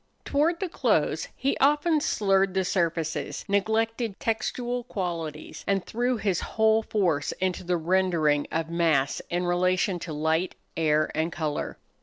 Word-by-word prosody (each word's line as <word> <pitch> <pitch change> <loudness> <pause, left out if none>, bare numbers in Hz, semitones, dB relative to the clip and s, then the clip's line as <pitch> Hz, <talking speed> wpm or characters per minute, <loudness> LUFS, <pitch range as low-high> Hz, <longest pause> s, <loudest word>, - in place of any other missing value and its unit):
Toward 320 +4 +1
the 385 - -1
close 345 - +1
he 275 - 0
often 295 +3 +3
slurred 195 - +2
the 190 -1 +1
surfaces, 165 -5 -1
neglected 220 +2 0
textual 240 +2 -2
qualities, 165 -8 -5
and 195 -2 +1
threw 245 +2 0
his 195 -5 0
whole 220 0 +2
force 185 -10 0
into 185 -1 -2
the 180 0 0
rendering 165 -4 +2
of 160 0 -1
mass 160 -5 +1
in 175 +1 -1
relation 180 +1 +1
to 165 - -6
light, 160 +4 0 0.2
air, 155 -1 +2
and 160 +2 -1
color. 155 -3 -3
185 Hz, 140 wpm, -26 LUFS, 165-220 Hz, 0.2 s, often